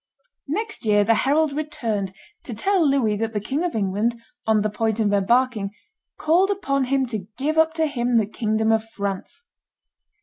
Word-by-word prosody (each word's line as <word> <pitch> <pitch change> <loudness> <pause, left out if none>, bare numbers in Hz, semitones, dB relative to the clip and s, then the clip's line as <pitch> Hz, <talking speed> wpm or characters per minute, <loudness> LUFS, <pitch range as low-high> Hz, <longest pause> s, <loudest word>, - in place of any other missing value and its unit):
Next 440 +9 -3
year 205 -2 +4
the 225 +3 +4
herald 290 +5 +2
returned 235 -10 -2 0.3
to 235 - -6
tell 360 - +2
Louis 245 -7 +2
that 225 +1 -2
the 210 - 0
King 270 - -2
of 350 -6 -2
England, 215 +3 0 0.3
on 215 -2 +3
the 215 - +1
point 220 +1 -1
of 205 -2 +2
embarking, 220 +1 +2 0.5
called 345 +5 +3
upon 275 -10 0
him 265 +1 +1
to 215 -6 -5
give 305 +4 0
up 320 0 +3
to 320 -1 +2
him 245 -5 0
the 220 - +3
kingdom 220 +1 0
of 220 -1 +2
France. 215 - -5
235 Hz, 175 wpm, -23 LUFS, 215-300 Hz, 0.5 s, year